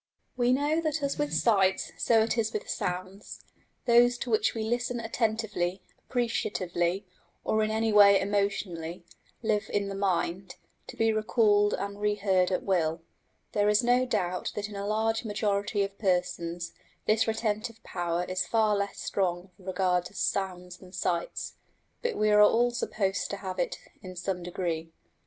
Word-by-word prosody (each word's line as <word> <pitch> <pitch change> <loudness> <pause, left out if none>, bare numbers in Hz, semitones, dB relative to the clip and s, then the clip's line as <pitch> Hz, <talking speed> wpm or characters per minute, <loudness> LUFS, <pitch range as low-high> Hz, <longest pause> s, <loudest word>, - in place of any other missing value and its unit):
We 245 -1 +2
know 295 +5 +2
that 310 -2 -1
as 280 +1 -1
with 295 0 0
sights 195 -4 +2
so 225 -2 +3
it 225 - 0
is 225 -2 0
with 215 - -3
sounds: 185 +3 -5 0.4
those 240 +1 +5
to 240 - -4
which 220 +1 +2
we 220 - -2
listen 240 +2 -1
attentively, 220 -5 -1 0.3
appreciatively, 195 -6 -1 0.4
or 220 - +1
in 215 - +1
any 220 0 +1
way 200 -1 +8
emotionally, 190 -4 -2 0.4
live 215 -1 0
in 200 -1 0
the - - -4
mind, 190 -1 -1 0.3
to - - -10
be 225 0 +3
recalled 215 -1 +3
and 200 0 -5
reheard 200 -3 +2
at 185 - -1
will. 165 -3 0 0.5
There 205 0 +2
is 210 +3 +4
no 250 +1 +3
doubt 180 -6 -1
that 210 0 -3
in 205 - -9
a 200 0 -4
large 220 +2 0
majority 205 -1 0
of 200 0 -6
persons 175 -3 -1 0.3
this 220 +2 +3
retentive 220 0 -2
power 175 0 -2
is 185 0 -2
far 220 -2 +3
less 200 0 -2
strong 185 -1 -1
with 190 - -16
regard 180 -1 +1
to 190 - -10
sounds 180 -2 -2
than 185 0 -15
sights, 175 -2 -2 0.4
but 475 -1 -1
we 215 0 +3
are 210 0 +6
all 235 +3 +5
supposed 200 -5 -1
to 200 - -3
have 190 -2 -6
it 175 - -1 0.2
in 185 -1 -9
some 180 0 -3
degree. 170 -2 -3
205 Hz, 165 wpm, -28 LUFS, 185-225 Hz, 0.5 s, way